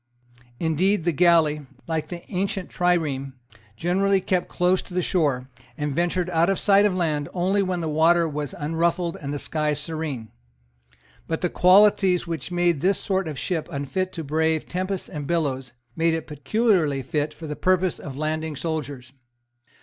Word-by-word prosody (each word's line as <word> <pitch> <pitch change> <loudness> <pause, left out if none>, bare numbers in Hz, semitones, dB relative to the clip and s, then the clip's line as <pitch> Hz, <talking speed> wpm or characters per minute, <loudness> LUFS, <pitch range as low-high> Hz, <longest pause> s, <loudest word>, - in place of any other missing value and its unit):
Indeed 175 +4 +1
the 170 - +2
galley, 155 -3 +3 0.2
like 160 -2 -2
the 175 0 -7
ancient 195 0 -2
trireme, 155 -7 0 0.4
generally 195 +5 +2
kept 180 -1 -1
close 180 +1 +2
to 180 - -11
the 180 - +2
shore, 140 -9 0 0.3
and 150 -2 -2
ventured 175 +3 0
out 170 +2 +3
of 195 - +1
sight 205 0 +5
of 190 - -2
land 155 -5 -1
only 190 +3 +2
when 185 -2 -1
the 160 - -2
water 165 +2 +3
was 150 -2 -4
unruffled 165 +3 0
and 140 -1 -4
the 145 - -2
sky 150 +1 -1
serene. 150 -6 -4 1.0
But 160 - -2
the 180 - +1
qualities 190 -1 +5
which 165 -1 -5
made 175 -4 +1
this 195 +2 +3
sort 190 -2 -1
of 150 -3 -5
ship 165 0 -2
unfit 185 +7 -2
to 165 - -5
brave 160 +2 0
tempests 185 +1 -3
and 145 -2 -6
billows 135 -7 -1 0.2
made 165 0 +2
it 160 - -4
peculiarly 150 - +1
fit 150 +2 -1
for 160 - -10
the 150 -1 -4
purpose 185 0 +1
of 135 -2 -8
landing 155 0 -2
soldiers. 140 -4 -4
165 Hz, 165 wpm, -24 LUFS, 150-180 Hz, 1.0 s, sight